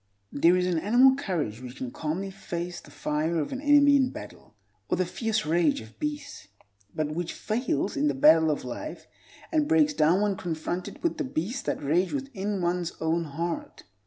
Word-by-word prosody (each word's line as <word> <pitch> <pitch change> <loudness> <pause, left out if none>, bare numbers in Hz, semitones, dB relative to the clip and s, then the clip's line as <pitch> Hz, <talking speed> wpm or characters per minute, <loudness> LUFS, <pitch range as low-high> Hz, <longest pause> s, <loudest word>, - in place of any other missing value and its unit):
There 170 +5 +4
is 180 - +1
an 175 -3 +1
animal 245 +9 +5
courage 165 - -3
which 125 0 -8
can 130 -2 -5
calmly 170 +8 -3
face 175 -2 -5
the - - -16
fire 155 +3 -1
of 150 - -3
an 265 - -4
enemy 285 -1 +6
in 260 -2 +2
battle, 105 - -11 0.3
or - - +1
the 185 - +1
fierce 215 +4 -1
rage 160 -2 +2
of 110 0 -13
beasts, 295 -1 -5 0.5
but 155 -1 -1
which 170 +1 -3
fails 225 - -1
in 145 +2 +1
the 145 - +1
battle 160 +4 +6
of 150 -4 -2
life 305 - -6 0.5
and 310 -2 +2
breaks 305 -2 +4
down 175 - +3
when 205 -2 +1
confronted 175 -1 -4
with 335 - 0
the - - +1
beasts 230 - -3
that - - -3
rage 175 +6 +1
within 210 -9 -3
one's 175 0 -1
own 165 +1 0
heart. 165 +3 -4
175 Hz, 190 wpm, -27 LUFS, 155-250 Hz, 0.5 s, enemy